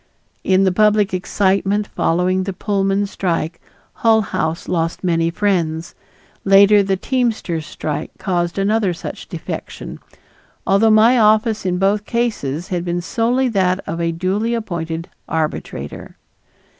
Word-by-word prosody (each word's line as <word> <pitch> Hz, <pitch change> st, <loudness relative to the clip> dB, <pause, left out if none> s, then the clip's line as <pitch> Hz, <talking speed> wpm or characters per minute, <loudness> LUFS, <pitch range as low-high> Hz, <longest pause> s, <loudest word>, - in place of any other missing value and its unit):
In 190 Hz, 0 st, +3 dB
the 190 Hz, -, +3 dB
public 210 Hz, 0 st, +3 dB
excitement 195 Hz, +2 st, +1 dB
following 180 Hz, 0 st, 0 dB
the 195 Hz, -, -3 dB
Pullman 195 Hz, 0 st, 0 dB
strike 170 Hz, -4 st, -2 dB, 0.3 s
Hull 225 Hz, -2 st, +3 dB
House 160 Hz, -4 st, -3 dB
lost 165 Hz, 0 st, -2 dB
many 165 Hz, -2 st, +1 dB
friends; 170 Hz, -3 st, -1 dB, 0.5 s
later 200 Hz, +1 st, +6 dB
the 195 Hz, -1 st, 0 dB
teamsters' 220 Hz, -, -1 dB
strike 150 Hz, 0 st, -4 dB
caused 175 Hz, -2 st, -1 dB
another 200 Hz, -2 st, +1 dB
such -, -, -8 dB
defection, -, -, -7 dB, 0.7 s
although 200 Hz, +3 st, +4 dB
my 225 Hz, +3 st, +5 dB
office 215 Hz, -1 st, +3 dB
in 180 Hz, 0 st, 0 dB
both 200 Hz, +2 st, +1 dB
cases 205 Hz, -, -2 dB
had 175 Hz, -3 st, -2 dB
been 175 Hz, 0 st, -2 dB
solely 240 Hz, +7 st, 0 dB
that 185 Hz, -4 st, +1 dB
of 165 Hz, +1 st, -3 dB
a 170 Hz, 0 st, 0 dB
duly 195 Hz, +7 st, -1 dB
appointed 170 Hz, -6 st, -4 dB, 0.2 s
arbitrator. 150 Hz, -, -4 dB
195 Hz, 130 wpm, -19 LUFS, 170-210 Hz, 0.7 s, later